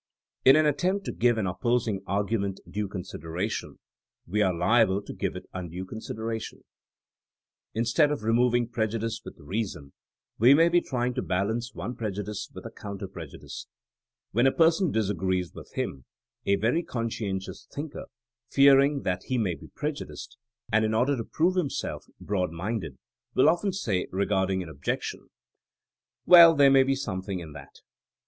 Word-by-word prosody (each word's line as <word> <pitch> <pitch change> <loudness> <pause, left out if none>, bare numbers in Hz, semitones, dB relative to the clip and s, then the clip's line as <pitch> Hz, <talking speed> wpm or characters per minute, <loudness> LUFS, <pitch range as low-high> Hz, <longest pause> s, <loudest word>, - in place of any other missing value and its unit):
In 135 - +8
an 155 0 +4
attempt 185 +7 +1
to - - -2
give 120 -1 +2
an 110 - 0
opposing 105 +2 0
argoment 100 0 -1
due 105 0 -3
consideration, 90 0 -5 0.5
wo 105 +5 0
are 95 - +3
liable 100 +2 +3
to - - -8
give - - -3
it - - -7
undue 90 0 -5
consideration* 110 +2 -5 1.1
Instead 115 +7 +3
of 145 -7 -3
removing 120 +1 +2
prejudice 115 -1 -2
with - - -10
reason 85 -4 -4 0.5
we 125 +5 +7
may 165 +3 +5
be 175 0 +4
trying 125 -4 -2
to - - -2
balance 110 +7 -2
one 125 - -5
prejudice 105 -1 -4
with - - -10
a - - -6
counter 100 -1 -7
prejudice. 85 -6 -9 0.6
When 120 +5 +3
a - - +4
person 165 +3 +3
disagrees 95 -4 -1
with - - -11
him, 65 -2 -4 0.4
a 100 - +4
very 115 - +1
conscientious 115 - -4
thinker, 145 +1 -6 0.4
fearing 140 +1 +5
that 90 0 -2
he 130 - -1
may 100 -7 +1
be - - -11
prejudiced, 145 -3 -6 0.4
and 110 +1 +3
in 110 0 +1
order 130 +5 +2
to 115 - -3
prove 175 +10 +1
him 175 -6 +1
self - - -4
broad 95 -3 -1
minded, 85 - -4 0.4
wUl 130 - +5
often 175 +5 +2
say 110 - -1
regarding 95 -1 0
an - - -10
objection, 70 -2 -4 1.0
Well, 170 -2 +9
there 140 -2 +6
may 135 0 +7
be 135 +1 +2
something 95 -7 -4
in 80 -3 -9
that. - - -13
110 Hz, 155 wpm, -27 LUFS, 95-135 Hz, 1.1 s, Well